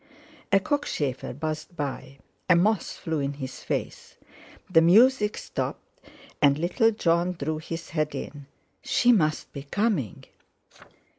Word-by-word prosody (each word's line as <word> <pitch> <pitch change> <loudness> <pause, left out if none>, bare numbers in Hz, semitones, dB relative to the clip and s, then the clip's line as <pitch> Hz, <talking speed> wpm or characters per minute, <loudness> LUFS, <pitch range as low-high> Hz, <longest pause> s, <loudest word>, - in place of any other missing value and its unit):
A 195 - +6
cockchafer 155 - -2
buzzed 155 +5 -5
by, 135 -2 -5 0.3
a 180 - +7
moth 200 +2 +1
flew 160 -2 -3
in 140 0 -2
his 135 -2 -8
face, - - -4 0.5
the 165 -3 +5
music 210 +5 +5
stopped, - - -6 0.4
and 140 -1 +5
little 185 - +2
Jon 175 -4 +1
drew 155 -1 -3
his 165 +1 -7
head 155 -2 -1
in. 145 -2 -7 0.3
She 245 - +3
must 155 -9 +1
be 140 - -6
coming! 155 - -1
165 Hz, 130 wpm, -26 LUFS, 145-195 Hz, 0.5 s, a